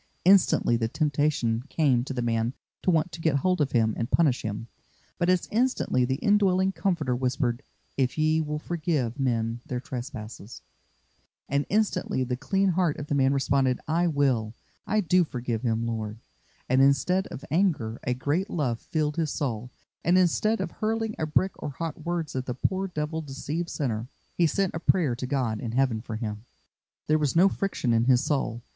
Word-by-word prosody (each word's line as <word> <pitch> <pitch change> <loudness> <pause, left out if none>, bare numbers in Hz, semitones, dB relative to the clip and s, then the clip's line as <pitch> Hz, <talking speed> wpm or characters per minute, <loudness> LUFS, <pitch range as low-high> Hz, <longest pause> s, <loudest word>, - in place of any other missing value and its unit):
Instantly 185 -10 +5
the 115 -1 0
temptation 145 -5 0
came 135 -7 +2
to 135 - -6
the 125 -2 -2
man 115 +1 0 0.3
to - - 0
want 165 0 +2
to 165 - -8
get 160 -3 +2
hold 180 +4 +1
of 140 - 0
him 110 -3 +3
and 115 +1 -3
punish 145 -7 +3
him, 105 +1 -4 0.5
but 175 - +2
as 185 -1 +2
instantly 225 - +1
the 130 +1 0
indwelling 190 +2 +3
Comforter 170 -10 0
whispered, 125 -1 -1 0.4
"If 130 0 0
ye 155 +1 +3
will 150 -1 -3
forgive 150 -6 -2
men 115 -3 0
their 125 - -2
trespasses;" 120 -4 -7 0.8
and 140 +1 0
instantly 210 -10 +1
the 125 0 -2
clean 195 +9 +1
heart 175 -3 +1
of 145 - -5
the - - 0
man 135 -1 +3
responded, 135 -2 +1
"I 170 +3 +2
will, 130 -8 +1 0.3
I 215 0 +2
do 180 0 +3
forgive 120 -6 -3
him, 115 -2 0
Lord;" 110 -2 -3 0.5
and 130 +1 +3
instead 180 +7 +3
of 140 - -8
anger 150 - +1
a 125 - 0
great 150 +9 -1
love 125 -8 -1
filled 150 -1 -2
his 160 -2 0
soul, 125 -5 -3 0.3
and 175 +3 +4
instead 215 +5 +2
of - - -3
hurling 225 0 -1
a 155 - -1
brick 185 +5 +2
or - - -3
hot 155 +2 -5
words 170 -3 -3
at 130 0 -3
the 125 - -2
poor 190 +8 -1
Devil 160 -2 -3
deceived 150 +4 -4
sinner, 120 -6 -2 0.3
he 170 - +3
sent 195 +4 0
a 165 - -3
prayer 160 -7 +2
to 125 +1 -5
God 125 -6 -1
in 115 -2 -4
Heaven 125 -4 +1
for 115 -1 -6
him. 105 -1 -4 0.6
There 155 0 +2
was 150 -1 0
no 180 +4 +6
friction 195 -11 -1
in 115 0 +3
his 125 +1 +4
soul. 130 -6 -1
140 Hz, 185 wpm, -27 LUFS, 120-170 Hz, 0.8 s, no